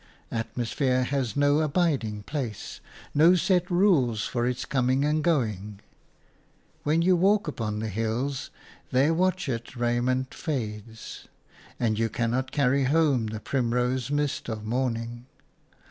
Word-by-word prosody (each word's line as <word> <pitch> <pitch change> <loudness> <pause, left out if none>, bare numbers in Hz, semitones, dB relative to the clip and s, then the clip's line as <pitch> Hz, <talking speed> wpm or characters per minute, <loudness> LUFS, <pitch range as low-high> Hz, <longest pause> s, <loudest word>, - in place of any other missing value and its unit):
Atmosphere 120 +3 0
has 130 -2 -1
no 145 +1 +4
abiding 140 - 0
place, 125 -5 -5 0.3
no 165 +5 +6
set 180 0 +2
rules 155 - +3
for 120 0 -1
its 125 0 -2
coming 130 +1 +1
and 150 +1 +1
going; 105 - 0 1.0
when 160 +3 +2
you 185 +1 +5
walk 195 +2 +3
upon 110 -7 -3
the 110 +1 -3
hills, 115 +6 -2 0.4
their 135 +5 +3
watchet 165 -10 -1
raiment 120 +2 0
fades, 115 - -5 0.5
and 110 -2 +1
you 115 0 +1
cannot 125 +3 -1
carry 140 -1 +2
home 140 -5 +2
the 110 0 -5
primrose 125 +1 0
mist 145 -3 -1
of 110 -1 -5
morning. 120 0 -2
130 Hz, 125 wpm, -27 LUFS, 115-150 Hz, 1.0 s, no